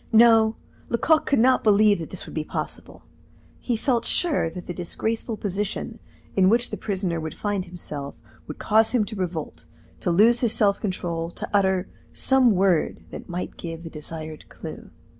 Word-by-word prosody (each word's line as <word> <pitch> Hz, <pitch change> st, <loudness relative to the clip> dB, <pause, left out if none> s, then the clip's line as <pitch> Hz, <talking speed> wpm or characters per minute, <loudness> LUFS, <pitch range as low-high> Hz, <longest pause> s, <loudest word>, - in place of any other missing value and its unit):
No; 225 Hz, -1 st, +6 dB, 0.3 s
Lecoq 310 Hz, +7 st, +2 dB
could 280 Hz, -, +3 dB
not 255 Hz, +3 st, +4 dB
believe 210 Hz, -2 st, +5 dB
that 165 Hz, -, -6 dB
this 185 Hz, -, -7 dB
would -, -, -10 dB
be 155 Hz, -, -2 dB
possible. -, -, -6 dB, 0.6 s
He 240 Hz, -3 st, -1 dB
felt 240 Hz, -1 st, +1 dB
sure 300 Hz, -, +1 dB
that 180 Hz, +2 st, -8 dB
the 175 Hz, -, -5 dB
disgraceful 220 Hz, +6 st, -3 dB
position 210 Hz, +3 st, -3 dB, 0.4 s
in 190 Hz, -1 st, +5 dB
which 235 Hz, +3 st, +2 dB
the -, -, -2 dB
prisoner 185 Hz, -5 st, -2 dB
would 160 Hz, 0 st, -5 dB
find 205 Hz, -3 st, -2 dB
himself 150 Hz, -6 st, -7 dB, 0.3 s
would 150 Hz, -, -7 dB
cause 220 Hz, +2 st, +3 dB
him 230 Hz, -4 st, +3 dB
to 215 Hz, -, -7 dB
revolt, 180 Hz, -5 st, -4 dB, 0.3 s
to -, -, -1 dB
lose 220 Hz, +7 st, +5 dB
his 235 Hz, -3 st, +2 dB
self 205 Hz, -3 st, +2 dB
control, 170 Hz, -4 st, -3 dB
to -, -, -6 dB
utter 190 Hz, -2 st, +2 dB, 0.3 s
some 260 Hz, -5 st, +4 dB
word 185 Hz, -3 st, +1 dB
that -, -, -9 dB
might 175 Hz, +1 st, -5 dB
give 165 Hz, -1 st, -6 dB
the 165 Hz, -, -8 dB
desired 155 Hz, 0 st, -7 dB
clue. -, -, -9 dB
200 Hz, 175 wpm, -24 LUFS, 170-225 Hz, 0.6 s, No